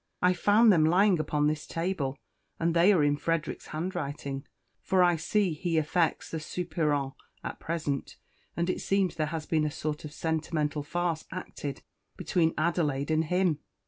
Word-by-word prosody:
I 180 0 +4
found 205 +5 +5
them 160 -3 +4
lying 180 +3 +4
upon 150 -1 0
this 150 0 -1
table, 165 -6 -2 0.4
and 165 0 +1
they 175 +4 +6
are 175 -7 +4
in 145 0 +2
Frederick's 165 +1 -2
handwriting, 150 -5 -4 0.3
for 185 -1 +3
I 175 -1 +4
see 185 +3 +1
he 165 +1 -1
affects 160 +1 +1
the 160 - -2
soupirant 150 -4 -1 0.3
at - - -5
present; 155 -4 -3 0.4
and 170 0 +1
it 185 - -1
seems 195 -2 +1
there 155 -2 -1
has 155 0 -4
been 155 -1 +1
a 150 - +1
sort 150 +1 -4
of 150 - -6
a - - -16
sentimental 155 -2 -1
farce 170 +2 -2
acted 145 -6 -6 0.3
between 165 -2 +1
Adelaide 155 -3 0
and 160 +1 +2
him. 180 -2 +1
160 Hz, 170 wpm, -29 LUFS, 150-175 Hz, 0.4 s, they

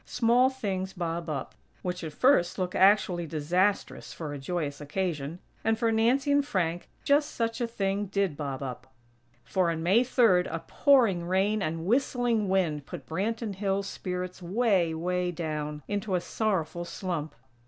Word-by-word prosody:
Small 245 +2 +3
things 195 -7 -3
bob 170 -1 -3
up, 140 -4 -4 0.3
which, 180 -1 -3
at 160 - -4
first, 175 - +3
look 180 -1 -2
actually 185 -3 +4
disastrous 175 +7 0
for 155 -3 -5
a 145 - -6
joyous 150 -1 -3
occasion; 150 -1 -3 0.3
and 225 0 +2
for 230 0 +1
Nancy 245 +6 +2
and 285 0 +4
Frank, 175 - -2
just 290 +1 +2
such 230 +1 -1
a 240 - +1
thing 200 -2 -1
did 195 -4 0
bob 140 -2 -4
up; 130 0 -7 0.5
for, 185 -3 +1
on 160 -1 -2
May 195 +8 +4
Third, 225 -8 +4
a 165 - -5
pouring 225 -12 +3
rain 195 +4 +1
and 165 -2 -2
whistling 240 -2 +1
wind 165 -7 0
put - - -8
Branton 215 +5 -2
Hills' 195 0 -1
spirits 180 -1 -5
way, 190 -2 +2
way 180 +2 -1
down 150 -3 -4
into 205 -1 -1
a - - +2
sorrowful 175 -4 -1
slump. 170 -4 -4
185 Hz, 160 wpm, -28 LUFS, 165-220 Hz, 0.5 s, actually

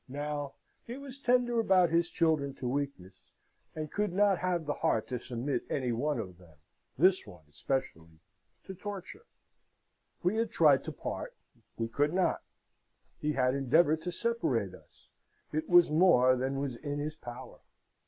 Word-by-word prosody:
Now 145 0 -4 0.3
he 240 +2 -7
was 275 -1 -10
tender 245 -2 +2
about 185 -6 +4
his 170 +1 +2
children 155 -6 +1
to 125 - -5
weakness, 95 -10 -4 0.5
and 155 -1 -5
could 210 -2 -1
not 200 0 +3
have 180 -3 -1
the 145 - -1
heart 110 - 0
to 125 - -2
submit 125 +2 -3
any 130 -3 -1
one 140 +5 -1
of 95 -6 -6
them 85 -4 -18 0.4
this 185 - +3
one 90 -6 -13
especially 80 - -4 0.4
to 190 - -8
torture. 205 - -8 1.0
We 185 +5 +1
had 230 0 0
tried 150 -5 +4
to - - -4
part: - - -6 0.4
we 115 - -1
could 145 +8 0
not. 185 -1 +1 0.8
He 150 0 -1
had 130 -2 +2
endeavoured 150 +4 +3
to 180 +2 -4
separate 135 - -1
us: - - -18 0.4
it 155 +1 -2
was 175 -3 +6
more 150 -7 +5
than 135 +2 -2
was 140 -3 -3
in 145 +2 -4
his 150 +1 -3
power. 120 -5 -10
145 Hz, 160 wpm, -31 LUFS, 125-180 Hz, 1.0 s, was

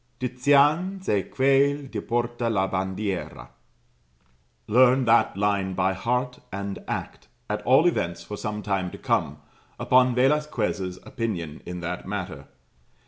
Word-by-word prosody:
'" - - -41
"Tizian 145 +9 +2
ze 105 - +2
quel 140 +2 +3
die - - -3
porta 120 0 -1
la 95 -4 +1
bandiera" 95 +1 -3 1.2
Learn 125 +3 +4
that 115 -4 +3
line 100 -2 0
by 95 +1 +1
heart 125 +6 -2
and 100 0 -4
act, - - -5 0.2
at - - -2
all 130 +6 +6
events 85 - 0
for 105 - -7
some 105 0 -4
time 95 -3 -1
to - - -10
come, - - 0 0.4
upon 125 -1 +4
Velasquez' 125 -9 0
opinion 85 -10 -4
in 90 0 -5
that 85 +1 -5
matter. 90 -8 -5
110 Hz, 135 wpm, -25 LUFS, 95-130 Hz, 1.2 s, all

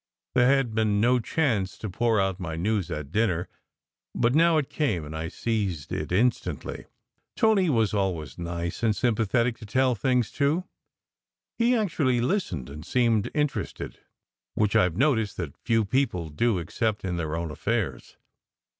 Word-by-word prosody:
There 125 -1 +4
had 135 -4 +2
been 110 -2 +2
no 125 +3 +4
chance 110 - 0
to 110 - -5
pour 110 +3 +1
out 95 -1 0
my 80 -4 -4
news 100 +1 -1
at 75 -1 -5
dinner, 95 -5 +1 0.7
but 120 +2 +2
now 165 +2 +5
it 145 -4 0
came 105 - -1
and 75 +2 -7
I 80 +1 -3
seized 95 -7 -2
it - - -3
instantly. 115 +7 0 0.5
Tony 205 -5 +3
was 115 -7 +2
always 90 -7 -2
nice 85 0 -4
and 110 -2 +2
sympathetic 115 +1 +1
to 110 - -9
tell 130 +4 +2
things 125 +1 +1
to! 150 +6 +2 1.0
He 240 +2 +4
actually 150 - +1
listened 120 - -1
and 75 +2 -9
seemed 115 0 +1
interested, 150 -2 -2 0.6
which 105 -2 +1
I 90 - +5
ve 85 - -9
noticed 115 -6 +2
that 80 -6 -5
few 115 -2 +1
people 100 - 0
do 105 +8 +1
except 105 +5 -2
in 90 -2 -2
their 80 -2 -2
own 85 -1 -3
affairs. 100 - -3
110 Hz, 160 wpm, -26 LUFS, 90-125 Hz, 1.0 s, now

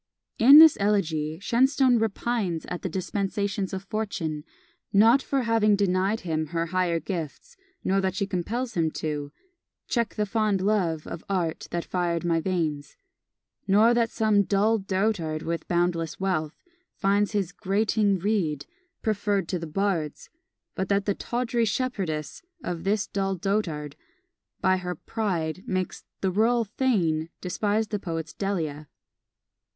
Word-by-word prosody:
In 270 +6 +9
this 320 -1 +9
Elegy 160 -7 0
Shenstone 255 +3 +3
repines 220 -5 -1
at 180 - -4
the 185 - -3
dispensations 195 +2 -2
of 190 0 -4
Fortune, 195 -8 -3 0.5
not 225 +7 +6
for 270 -1 -1
having 225 -3 +3
denied 195 +2 +1
him 160 -2 -2
her 165 +1 -1
higher 180 -2 +1
gifts, 165 -5 -6 0.3
nor 195 +1 +2
that 190 -1 -1
she 200 - 0
compels 225 +7 -3
him 165 -4 +1
to 145 -2 -3 0.6
Check 235 -4 -1
the 210 - 0
fond 210 -1 +1
LOVE 185 -6 0
OF 170 - -7
ART 175 -5 -1
that 170 -1 -3
fired 175 -2 -1
my 165 -1 +2
veins; 160 -5 -2 0.7
nor 215 +4 +5
that 235 -1 +2
some 215 -3 +2
"dull 210 +3 +2
dotard 190 -5 -1
with 165 0 -3
boundless 170 -2 0
wealth" 170 -6 -1 0.4
finds 200 +2 +1
his 200 -4 0
"grating 205 +1 +1
reed" 170 -7 -1 0.4
preferred 205 -4 0
to 180 - -1
the 165 - -6
bard's, 170 -3 -2 0.4
but 190 - -3
that 200 0 +1
the 200 - +1
"tawdry 240 +2 -1
shepherdess" 195 - -2 0.2
of 175 -1 -4
this 205 +1 +1
dull 195 -1 -2
dotard, 170 -6 -2 0.7
by 185 0 +3
her 180 -1 -4
"pride," 185 -3 -3
makes 185 -1 -3 0.2
"the 190 - +1
rural 230 +4 +3
thane" 190 -9 0
despise 205 +4 -1
the 210 - -2
poet's 165 -4 -5
Delia. 160 -7 -3
195 Hz, 140 wpm, -26 LUFS, 170-215 Hz, 0.7 s, In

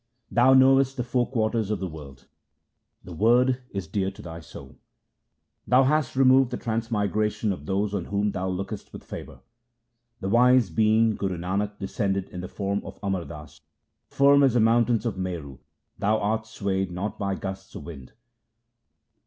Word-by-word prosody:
Thou 130 +2 +5
knowest 135 0 +5
the 125 - -1
four 125 0 0
quarters 110 -3 0
of 105 - -1
the 95 - -3
world; 75 -5 -11 0.8
the 90 - -9
Word 125 +7 +3
is 100 -3 -5
dear 95 +3 -1
to 100 +2 -12
thy 85 -1 -8
soul. 80 - -13 0.9
Thou 130 +2 +5
hast 145 0 +1
removed 130 -1 +5
the 125 - -4
transmigration 110 -2 -1
of 75 -5 -10
those 100 +1 -1
on 95 -4 -2
whom 105 +1 0
thou 95 0 -3
lookest 95 +3 -5
with - - -9
favour. - - -9 0.8
The 95 - -4
wise 125 -2 +4
being 110 +4 +3
Guru 95 -3 -3
Nanak 100 +4 -2
descended 100 -1 -2
in 90 - -7
the 90 - -6
form 100 0 -2
of - - -10
Amar 95 -4 -1
Das. 75 -2 -11 0.5
Firm 140 +1 +4
as 135 -4 +4
the - - +4
mountain 115 +1 +3
of 105 -5 -2
Meru 80 -8 -5 0.4
thou 105 +2 +2
art 110 +1 -1
swayed 95 -3 -2
not 90 +4 -4
by 100 -1 -1
gusts 95 0 -7
of - - -7
wind. 70 -7 -10
105 Hz, 170 wpm, -25 LUFS, 95-120 Hz, 0.9 s, Thou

